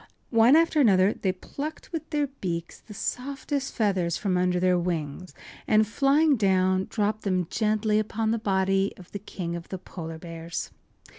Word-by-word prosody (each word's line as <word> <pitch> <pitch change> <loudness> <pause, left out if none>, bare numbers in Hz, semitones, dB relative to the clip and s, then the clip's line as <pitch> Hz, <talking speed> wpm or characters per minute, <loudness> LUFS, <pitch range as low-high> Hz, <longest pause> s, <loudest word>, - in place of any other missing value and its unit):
One 230 +4 +6
after 325 -2 +4
another 195 -4 +5
they 190 - -1
plucked 285 +11 -7
with 320 -2 -5
their 295 -2 +1
beaks 175 -11 -5
the 210 - -13
softest 270 +4 -3
feathers 190 -6 +1
from 195 -3 -1
under 180 0 +2
their 180 0 +3
wings, 170 0 -4 0.3
and, 215 0 +4
flying 280 +5 +3
down, 190 -2 +2
dropped 215 0 -1
then 185 -3 0
gently 215 -1 +1
upon 220 +1 -1
the 230 - 0
body 195 -1 +1
of 180 - -14
the 200 - -5
King 175 -4 -5
of 170 -1 -8
the 190 - -4
Polar 165 -3 -8
Bears. 165 0 -6
200 Hz, 165 wpm, -26 LUFS, 180-230 Hz, 0.3 s, One